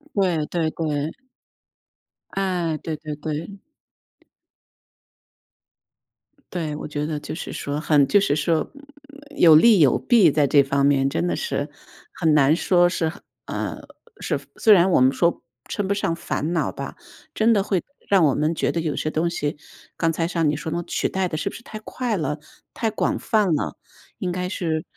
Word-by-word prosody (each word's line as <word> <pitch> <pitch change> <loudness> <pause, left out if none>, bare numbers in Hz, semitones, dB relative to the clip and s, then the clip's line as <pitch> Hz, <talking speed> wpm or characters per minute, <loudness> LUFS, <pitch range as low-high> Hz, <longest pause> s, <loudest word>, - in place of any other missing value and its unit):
对 175 -6 +1
对 165 -2 -1
对。 155 -1 -2 1.2
哎， 180 -5 -1
对 160 0 -5
对 150 -1 -6
对。 160 +6 -6 2.9
对， 160 -4 -3
我 - - -6
觉 145 0 -3
得 155 -1 -3
就 145 - -6
是 165 - -6
说 145 +1 -3
很 150 -3 +3
就 205 - +5
是 170 -7 +1
说， 155 +1 +1
嗯， 290 +1 -16
有 160 -3 +8
利 215 +5 +6
有 140 -6 +5
弊， 225 -9 +4
在 145 0 +2
这 140 0 +5
方 140 0 +1
面 135 -1 +3
真 165 - -1
的 175 - 0
是 470 - -2 0.4
很 160 -3 +1
难 145 0 +5
说 175 +1 +3
是 170 -2 -1
很， 160 - -7 0.2
啊， - - -4 0.4
是 150 - -1 0.2
虽 220 - +6
然 185 -1 +4
我 - - +4
们 130 +1 +4
说 170 +3 +1 0.3
称 200 -2 -2
不 200 - +1
上 200 -4 -1
烦 165 -1 -3
恼 170 - 0
吧， - - -7 0.4
真 225 +1 +3
的 200 -3 +2
会 190 -3 0 0.3
让 190 -5 +5
我 140 - +2
们 155 +2 +1
觉 - - -1
得 165 - -1
有 155 -3 -2
些 155 - -1
东 160 +2 0
西， 150 -3 -3 0.4
刚 165 -1 +1
才 165 +1 -1
像 165 -4 +1
你 150 - -1
说 160 - -5
的 170 +2 -2
取 - - -1
代 190 -1 -1
得 155 - -3
是 - - -2
不 - - -11
是 235 - -11
太 215 - -8
快 225 0 -3
了、 150 -2 -2 0.4
太 225 -2 -1
广 215 - -1
泛 215 -3 +1
了？ - - -3 0.4
应 180 - -3
该 180 +1 -3
是 160 -5 -2
165 Hz, 195 characters per minute, -23 LUFS, 150-190 Hz, 2.9 s, 有